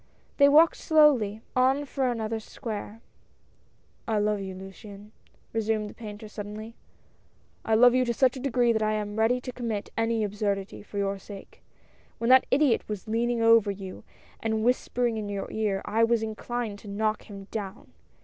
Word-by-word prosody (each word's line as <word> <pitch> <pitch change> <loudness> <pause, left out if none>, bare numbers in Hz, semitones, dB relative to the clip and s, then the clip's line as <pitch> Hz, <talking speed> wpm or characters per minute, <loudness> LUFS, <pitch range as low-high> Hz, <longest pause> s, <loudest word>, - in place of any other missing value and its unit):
They 280 -1 +7
walked 315 +3 +6
slowly 260 -10 +3
on 265 +3 +3
for 270 -2 -1
another 225 -2 -2
square. 220 0 -7 0.5
" - - -38
I 220 - +1
love 210 0 +1
you, 190 -1 -6
Luciane," 200 +2 -11 0.4
resumed 220 -1 -1
the - - -14
painter 215 -1 -9
suddenly. 210 +1 -7 0.9
"I 220 - +2
love 245 +2 +7
you 255 0 +3
to 240 - 0
such 260 +1 +3
a - - -6
degree 245 -3 +2
that 220 - 0
I 215 0 +1
am 210 0 -3
ready 225 +3 +3
to 255 0 -6
commit 230 -4 -4
any 225 -1 0
absurdity 205 -1 -2
for 205 - -9
your 200 0 -1
sake. 195 0 -12 0.6
When 230 +2 +1
that 260 0 +6
idiot 270 -6 +2
was 210 -1 -5
leaning 230 +1 0
over 225 -2 +5
you 195 -2 -7 0.4
and 220 -1 -1
whispering 245 -1 +1
in 210 -1 -4
your 200 -1 -4
ear, 210 -3 -1
I 220 +2 +1
was 230 -1 +2
inclined 220 -1 -4
to 210 - -14
knock 215 +2 -2
him 200 -1 -8
down. 200 -3 -6
220 Hz, 175 wpm, -27 LUFS, 205-240 Hz, 0.9 s, They